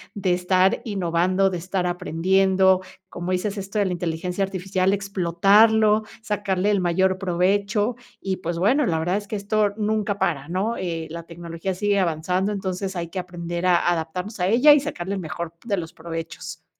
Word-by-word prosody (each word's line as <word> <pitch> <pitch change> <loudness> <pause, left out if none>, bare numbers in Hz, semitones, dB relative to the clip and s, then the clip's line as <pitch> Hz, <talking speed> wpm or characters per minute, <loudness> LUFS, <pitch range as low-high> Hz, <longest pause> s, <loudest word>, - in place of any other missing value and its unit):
de 190 -3 +1
estar 185 +1 +2
innovando, 185 -1 +1
de 180 - -3
estar 185 +1 -2
aprendiendo, 190 +2 +2 0.3
como 175 +1 -5
dices, 200 +3 -2
esto 195 +2 -5
de 205 - +3
la 185 - -1
inteligencia 180 +2 -2
artificial, 190 0 0
explotarlo, 205 +3 +3 0.2
sacarle 205 -1 0
el 200 - +2
mayor 185 +1 +1
provecho 200 +5 +1 0.3
y, 190 -1 -2
pues 170 -1 -4
bueno, 250 - +3
la 165 -2 +1
verdad 175 +4 0
es 205 0 -6
que 215 - -4
esto 205 0 0
nunca 210 -1 0
para, 165 -7 -1
¿no? 195 +7 -1
Eh, 165 -3 -3
la 170 0 -6
tecnología 170 +2 -5
sigue 205 +1 +1
avanzando, 180 +3 0
entonces 190 -1 -3
hay 170 -1 -4
que 185 - -4
aprender 175 0 -4
a 175 -1 +3
adaptarnos 180 +6 -4
a 180 - +1
ella 250 +8 +7
y 295 - +5
sacarle 200 -10 -4
el 190 - -4
mejor 170 +1 -5
de 205 -4 0
los 165 -1 -5
provechos. 165 0 -7
185 Hz, 175 wpm, -23 LUFS, 175-200 Hz, 0.3 s, ella